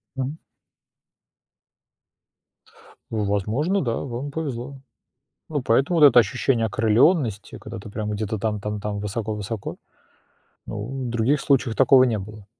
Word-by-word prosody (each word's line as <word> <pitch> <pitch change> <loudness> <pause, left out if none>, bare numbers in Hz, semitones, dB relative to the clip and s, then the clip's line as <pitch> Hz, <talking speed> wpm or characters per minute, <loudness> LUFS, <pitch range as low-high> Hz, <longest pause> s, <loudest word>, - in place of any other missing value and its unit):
Мгм. 135 +4 -3 2.7
Возможно, 110 - 0
да, 115 -2 -1
вам 130 +2 -5
повезло. 140 -3 -5 0.7
Ну, 145 -3 -1
поэтому 135 +9 +2
вот 150 - +10
это 125 -3 +6
ощущение 120 -1 +2
окрылённости, 110 - +2
когда 115 +1 -8
ты 105 +1 -10
прямо 105 0 -3
где-то 110 0 -3
там 105 0 -2
там 105 0 -4
там 105 -1 -3
высоко-высоко, 105 0 -4 0.9
ну 120 +5 -5
в - - -3
других 120 +5 +1
случаях 130 -5 +1
такого 130 0 +6
не 115 -4 +1
было. 105 +1 -9
115 Hz, 125 wpm, -23 LUFS, 105-135 Hz, 2.7 s, вот